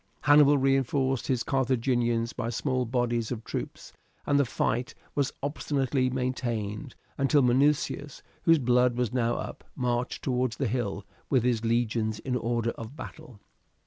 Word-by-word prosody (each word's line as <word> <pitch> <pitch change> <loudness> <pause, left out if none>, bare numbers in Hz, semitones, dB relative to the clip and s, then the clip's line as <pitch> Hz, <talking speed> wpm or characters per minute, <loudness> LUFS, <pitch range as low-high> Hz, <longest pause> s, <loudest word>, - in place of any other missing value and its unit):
Hannibal 145 0 +6
reinforced 135 -1 +1
his 130 -3 +1
Carthaginians 120 -3 +1
by 115 - -3
small 130 +1 -1
bodies 120 -1 -1
of 115 -2 -4
troops, - - -6 0.3
and 145 - +3
the 140 - +3
fight 120 +1 -1 0.2
was 140 -2 0
obstinately 140 -2 0
maintained 125 -3 -3 0.2
until 135 +1 +4
Minucius, 140 +2 +1 0.2
whose 165 -1 +5
blood 125 -2 +2
was 125 -1 -1
now 120 -2 +1
up, - - -6
marched 125 -1 -2
towards 125 -2 0
the 135 - 0
hill 105 -4 -2 0.2
with 130 -4 +3
his 120 -2 +1
legions 115 -2 0
in 125 +2 -3
order 115 -1 0
of 115 +4 -9
battle. 155 -8 -10
125 Hz, 145 wpm, -28 LUFS, 115-135 Hz, 0.3 s, Hannibal